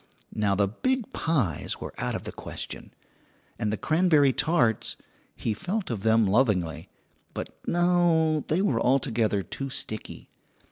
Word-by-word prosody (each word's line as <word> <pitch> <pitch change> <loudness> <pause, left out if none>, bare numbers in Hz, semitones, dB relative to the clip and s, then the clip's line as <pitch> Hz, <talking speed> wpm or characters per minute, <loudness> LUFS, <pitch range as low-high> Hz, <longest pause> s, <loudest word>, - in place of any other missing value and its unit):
Now 100 -2 +1
the 100 0 +2
big 255 - -2
pies 130 - -1
were - - -7
out - - -1
of - - -4
the - - -6
question, - - -7 0.7
and 110 -2 0
the 110 - -1
cranberry 155 - +3
tarts 145 -8 +1 0.4
he 110 - -2
felt 185 - -3
of 110 -4 -3
them 110 +1 +4
lovingly 95 -6 +1 0.5
but - - -5
no, 170 -3 +3
they 170 +5 +1
were 120 - +1
altogether 115 -6 +1
too 135 +7 -5
sticky. 110 -4 -4
130 Hz, 140 wpm, -27 LUFS, 105-165 Hz, 0.7 s, them